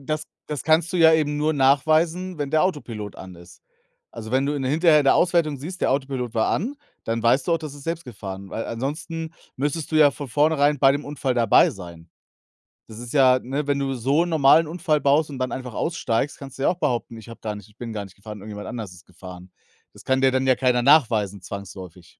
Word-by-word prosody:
das 155 +2 -3 0.2
das 150 -2 -4
kannst 160 +1 +2
du 180 - -1
ja 160 -1 +6
eben 150 -2 +1
nur 155 +1 +1
nachweisen, 155 +6 +2
wenn 145 -2 -3
der 155 +2 +3
Autopilot 115 - -3
an 95 -1 -10
ist. 85 +1 -16 0.5
Also, 110 -1 -8
wenn 135 +2 +1
du 145 - -1
in 140 - -3
der 130 - -1
hinterher 155 0 +4
in - - -2
der 135 - +5
Auswertung 170 -5 +2
siehst, 180 +7 -8
der - - +1
Autopilot 130 -3 -2
war 110 - +1
an, 250 - -2 0.3
dann 115 0 -2
weißt 125 +4 +2
du 170 - +3
auch, 165 - +2
das 155 -3 -8
ist 145 - -12
selbst 165 0 -4
gefahren, 100 -5 -8
weil 115 - -4
ansonsten 160 +6 -5 0.2
müsstest 145 +4 -2
du 155 - +2
ja 150 -2 +6
von 140 0 -8
vornherein 145 +2 +2
bei 135 0 +5
dem 145 +1 -3
Unfall 135 -3 -2
dabei 120 - +4
sein. 85 - -11 0.8
Das 110 - -11
ist 120 +2 -8
ja 130 -3 +5
ne, 140 +4 -4
wenn 145 -1 0
du 135 -1 -2
so 135 +6 +1
'n - - -5
normalen 160 0 +5
Unfall 155 -2 -1
baust 145 +2 +2
und 135 - -7
dann 130 0 -2
einfach 125 -2 -6
aussteigst, 140 -5 -2
kannst 135 -1 -11
du 135 - -2
ja - - +4
auch 175 - -1
behaupten, 120 -7 -2
ich 110 +1 -12
habe 115 - -12
gar 110 -1 -4
nicht 105 0 -12
ich 105 - -28
bin 120 -2 -6
gar 105 -1 -4
nicht 95 -1 -14
gefahren, 105 +1 -10
irgendjemand 105 0 -8
anders 110 -7 -6
ist 90 0 -17
gefahren. 90 0 -12 0.4
Das - - -15
kann 130 0 +1
dir 135 0 +4
dann 130 0 0
ja 130 - +5
keiner 125 -1 +1
nachweisen 110 - +3
zwangsläufig. 95 -3 -10
135 Hz, 240 wpm, -23 LUFS, 115-155 Hz, 0.8 s, ja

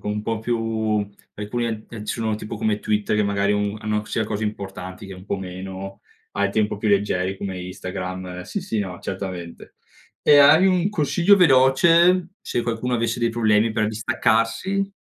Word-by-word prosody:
con 105 - -4
un 105 0 -3
po' 115 0 -2
più 120 +1 -1 0.8
alcuni 110 +3 -3
ad 110 -1 -5
eh, 105 -2 -8
sono 110 -1 -1
tipo 105 0 -6
come 105 -1 -1
Twitter, 105 0 0
che 105 - +2
magari 100 0 +1
un 105 0 -1
hanno 105 -1 -1
sia 110 +1 -2
cose 105 +1 -4
importanti 95 -2 -6
che 95 - -8
un 90 +1 -12
po' 100 - -2
meno, 95 +1 -7 0.3
hai 100 -1 0
tempo 105 0 0
più 105 +1 -2
leggeri 95 -2 +1
come 95 -2 -5
Instagram. 90 0 -6
Sì, 200 - -5
sì, 180 - -3
no, 90 -3 -5
certamente. 95 -3 -7 0.5
E 145 - +6
hai 150 +6 +7
un 185 0 +2
consiglio 175 +3 +3
veloce 170 +4 +5
se 120 - -2
qualcuno 120 +1 -2
avesse 115 0 -1
dei 115 - +2
problemi 110 -1 +2
per 110 -1 0
distaccarsi? 115 - 0
105 Hz, 175 wpm, -22 LUFS, 95-120 Hz, 0.8 s, hai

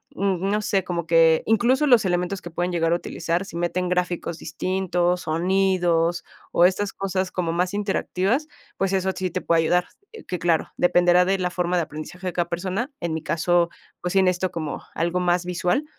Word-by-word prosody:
mm, 195 -1 0
no 210 +1 +1
sé, 195 -2 0
como 170 -2 -3
que 165 -1 +5
incluso 240 +6 +3
los 245 -6 +5
elementos 180 +1 -1
que 175 - -8
pueden 175 +2 -2
llegar 165 -1 +1
a - - +4
utilizar, 170 +1 -2
si 170 - -8
meten 175 +1 -1
gráficos 180 -2 -1
distintos, 180 +1 -1
sonidos 175 0 +1 0.3
o 175 - +5
estas 195 +2 +1
cosas 190 -1 -2
como 175 -3 -1
más 180 +2 0
interactivas, 205 +5 0 0.3
pues 195 0 0
eso, 190 0 +1
sí 185 -1 -2
te - - -3
puede 165 -1 +2
ayudar. 180 +2 +2 0.3
Eh, 445 - -11
que 180 - -3
claro, 165 -1 +1
dependerá 175 0 +4
de 195 +1 +1
la 180 -1 0
forma 180 0 -1
de 170 - +2
aprendizaje 155 +5 -8
de 180 - -2
cada 175 -1 -1
persona. 190 - -3
En 170 -2 -2
mi 160 - -5
caso, 170 +2 +2 0.3
pues 180 - -2
sí 195 - +5
necesito 185 0 +1
como 160 -4 -5
algo 170 +2 0
más 175 0 +1
visual, 180 - 0
180 Hz, 195 wpm, -23 LUFS, 170-190 Hz, 0.3 s, que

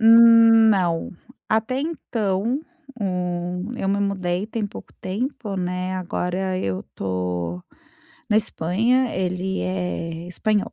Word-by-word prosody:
hum, 230 0 +8
não. 175 -5 +1 0.4
Até 225 +5 +1
então, 235 - -1 0.4
o 180 +1 -2
eu 195 - -2
me 200 +1 +1
mudei 190 -1 -1
tem 220 -2 -2
pouco - - -11
tempo, 210 0 -3
né, 180 +1 -2
agora 185 +1 -2
eu 95 - -2
estou 90 -2 -3 0.7
na 210 - +4
Espanha, 220 +5 +1
ele 185 +1 -1
é 175 -2 -3
espanhol. 205 +3 0
190 Hz, 110 wpm, -23 LUFS, 180-220 Hz, 0.7 s, hum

